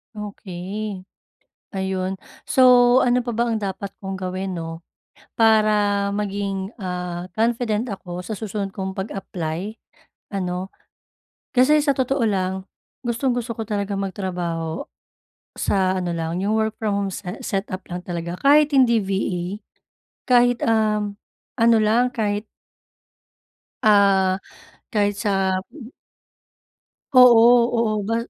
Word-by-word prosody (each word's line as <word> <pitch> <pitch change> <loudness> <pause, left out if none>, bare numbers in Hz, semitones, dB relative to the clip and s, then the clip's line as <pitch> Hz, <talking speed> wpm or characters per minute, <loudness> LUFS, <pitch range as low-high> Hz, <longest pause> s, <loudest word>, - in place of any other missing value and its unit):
Okey. 200 -1 -6 0.7
Ayun. 190 -1 -2 0.2
So 250 -1 +6
ano 250 -1 +3
pa 240 - -4
ba 235 +1 0
ang 220 -2 -1
dapat 195 0 -4
kong 190 -1 -4
gawin 185 0 -4
'no? 165 0 -6 0.6
Para 210 -2 +3
maging, 200 0 -3
ah, 180 -1 -4
confident 230 0 +1
ako 180 -1 -7
sa 220 - -4
susunod 200 -2 -4
kong 190 0 -5
pag-apply, 190 0 -4 0.6
ano. 185 -1 -3 0.9
Kasi 260 +4 +5
sa 280 - +3
totoo 260 -1 0
lang, 190 -2 -1 0.4
gustong-gusto 240 0 -1
ko - - -3
talagang 200 -2 -2
magtrabaho 175 -4 -4 0.6
sa 185 -1 0
ano 175 -2 -2
lang, 165 +2 -2
'yong 210 +3 +1
work 220 0 -1
from 215 -2 0
home 200 -1 -2
se 185 - -7 0.2
set-up 195 -2 -3
lang 175 - -3
talaga, 175 0 -5
kahit 295 +2 +5
hindi 250 -4 +5
VA. 190 -2 -1 0.9
Kahit, 245 -1 +4
um, 210 -2 +1 0.4
ano 230 0 +6
lang, 225 +4 +3
kahit 205 -2 -1 1.4
ah, 195 -3 +4 0.5
kahit 205 -2 +1
sa 195 -2 +1 0.2
mm. 275 -7 -11 1.3
Oo 240 -1 +7
oo, 230 - +3 0.3
ba 230 - +1
200 Hz, 115 wpm, -22 LUFS, 185-230 Hz, 1.4 s, Oo